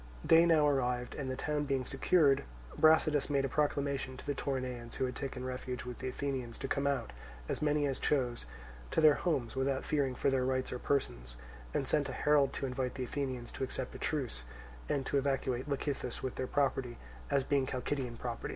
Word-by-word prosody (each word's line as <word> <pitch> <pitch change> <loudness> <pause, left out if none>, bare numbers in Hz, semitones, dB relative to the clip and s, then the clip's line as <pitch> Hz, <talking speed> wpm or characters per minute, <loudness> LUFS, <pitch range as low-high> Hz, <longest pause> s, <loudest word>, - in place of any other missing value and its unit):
Day 165 +1 +7
now 155 -3 +5
arrived, 125 -3 0
and 135 -2 -4
the 130 - -2
town 150 +2 -1
being 135 -2 0
secured, 140 0 +3 0.3
Brasidas 155 -2 +4
made 140 -1 +2
a - - -2
proclamation 140 -2 0
to - - -10
the 145 - 0
Toronaeans 130 -4 -3
who 130 - 0
had 125 0 -4
taken 130 -2 -4
refuge 125 -1 -4
with 125 -1 -6
the 130 - -4
Athenians, 130 -3 -3
to 135 - -4
come 140 +1 0
out, 135 - -1 0.3
as - - -2
many 150 -1 +2
as 135 -2 -1
chose, 125 - 0 0.4
to - - +1
their 155 -2 +8
homes 140 -10 -1
without 135 0 0
fearing 140 -4 +1
for 135 - +1
their 130 -1 +2
rights 130 0 0
or 125 - -4
persons, - - -1 0.3
and - - 0
sent - - +1
a - - -4
herald 145 -2 +3
to - - -2
invite 125 -1 -2
the 130 - -3
Athenians 130 -2 -3
to - - -4
accept 130 - -3
a - - -8
truce, - - -2 0.5
and 135 -2 0
to 140 - +2
evacuate 135 -1 -1
Lecythus 140 -3 -2
with 130 - -2
their 130 - -3
property, 135 -4 0 0.3
as 140 - +2
being 135 -1 +1
Chalcidian 130 -1 -2
ground. 120 -1 -4
135 Hz, 200 wpm, -33 LUFS, 125-140 Hz, 0.5 s, their